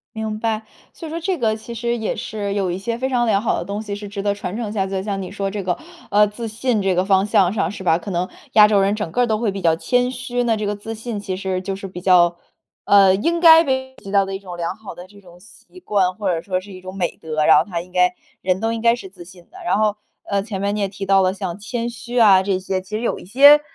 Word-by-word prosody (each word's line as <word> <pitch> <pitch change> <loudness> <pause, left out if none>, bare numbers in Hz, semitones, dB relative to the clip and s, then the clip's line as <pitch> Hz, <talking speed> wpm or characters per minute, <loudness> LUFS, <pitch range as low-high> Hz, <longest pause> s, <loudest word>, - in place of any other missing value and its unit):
明 220 -1 -3
白， 220 -1 -1 0.3
所 330 - -9
以 - - -7
说 330 +1 -4
这 360 0 -2
个 220 -3 +1
其 230 +2 -9
实 235 +1 -2
也 220 - -2
是 205 -2 -4
有 195 -3 0
一 175 - -2
些 230 +4 -3
非 260 +2 -2
常 245 -2 +1
良 205 -3 +2
好 225 - 0
的 - - -4
东 205 +2 -4
西 205 -2 -5
是 205 0 -7
值 200 0 -5
得 200 0 +1
传 200 -1 -5
承 225 -3 -4
下 195 -3 0
去 195 - -7
的。 190 - -1
就 195 - -9
像 200 -2 -2
你 185 - -6
说 200 -1 -3
这 200 0 -4
个 180 -1 0 0.4
呃， 210 +1 +5
自 225 +3 -6
信 225 0 -1
这 190 -1 +2
个 180 - +2
方 190 0 +3
向 190 -3 +3
上 205 -1 -1
是 200 -2 -8
吧， 165 -2 +3
可 185 +3 -7
能 180 +1 -1 0.2
亚 210 -1 +8
洲 205 -2 +3
人 200 +2 +2
整 205 -7 -4
个 245 - +1
儿 - - +3
都 220 -2 0
会 220 -3 0
比 195 - -5
较 165 -3 +3
谦 250 +8 +1
虚， 245 -1 -3
那 230 -2 +2
这 210 -1 -3
个 205 - -1
自 220 +2 -7
信 225 -1 -5
其 190 -2 -4
实 190 -1 -2
就 195 0 -3
是 195 0 -7
比 180 -1 -8
较 175 -2 +4 0.5
呃， 195 -2 +6
应 335 - 0
该 325 -1 +8
被 260 -2 -2
普 - - -19
及 195 - -8
到 200 -1 +4
的 195 0 -5
一 - - -5
种 185 -3 -9
良 170 +2 -3
好 220 -1 -10
的 180 +1 -11
这 200 +1 -17
种 175 -2 -17
习 240 - -17
惯， 195 - +1
或 200 0 -3
者 165 0 -2
说 185 -1 -2
是 200 +1 -13
一 185 - -10
种 185 +1 -9
美 180 -3 -2
德， 155 -1 -2
然 160 - +8
后 155 - +3
它 170 -3 -3
应 180 +1 -15
该 180 0 +3 0.3
人 185 0 +1
都 225 +1 0
应 230 -1 -3
该 235 0 +4
是 195 -6 -10
自 180 -2 -13
信 180 0 -15
的。 375 - -15
然 215 - +1
后， 210 -1 +1 0.3
呃， 200 -1 -1
前 200 -3 -5
面 200 +1 0
你 210 - -3
也 200 - +1
提 195 0 -7
到 195 -1 +5
了 185 +1 +2
像 190 -3 -5
谦 235 +3 -4
虚 240 +1 -4
啊 195 -4 +6
这 190 -1 0
些， 190 0 -2
其 185 - -14
实 220 - -2
有 240 - -1
一 - - -11
些， 285 +9 +7
200 Hz, 325 characters per minute, -20 LUFS, 185-225 Hz, 0.5 s, 亚